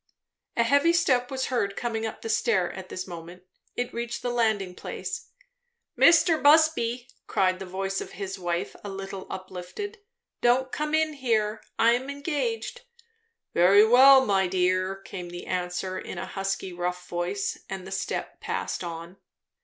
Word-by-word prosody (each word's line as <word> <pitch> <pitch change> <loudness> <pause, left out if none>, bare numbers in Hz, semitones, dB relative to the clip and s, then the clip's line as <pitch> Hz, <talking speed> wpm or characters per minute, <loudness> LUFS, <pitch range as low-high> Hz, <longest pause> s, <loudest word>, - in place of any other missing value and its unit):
A 235 - +5
heavy 285 +8 +4
step 255 -7 +2
was 265 -1 -2
heard 200 -5 0
coming 225 -2 -2
up 220 - -8
the - - -4
stair 205 -5 +2
at 190 -1 -9
this 185 - -5
moment. 175 0 -9 0.3
It 245 0 -3
reached 235 0 -4
the 245 - -1
landing 220 -6 +1
place. - - -6 0.7
"Mr. 335 -1 +5
Busby 285 -6 +4
" - - -43
cried 185 -1 +1
the 190 - -7
voice 195 +1 -2
of - - -8
his 195 0 -5
wife, 175 0 -2
a 205 - -5
little 195 0 -6
uplifted, 185 - -7 0.4
"don't 255 +2 +3
come 300 +1 -1
in 315 -1 +2
here 220 -6 0 0.2
I 230 - +5
am 250 +3 0
engaged." 345 - -3 0.7
"Very 195 +5 +6
well, 265 +3 +8
my 195 -3 +2
dear," 185 +1 +1
came 190 -2 -8 0.2
answer 185 +1 -2
in - - -7
a - - -3
husky, 195 -1 -3
rough 180 0 -3
voice, 175 +3 -2
and 190 -1 -5
the 190 - -9
step 195 - -3
passed - - -3
on. 170 +2 -7
200 Hz, 160 wpm, -26 LUFS, 185-250 Hz, 0.7 s, well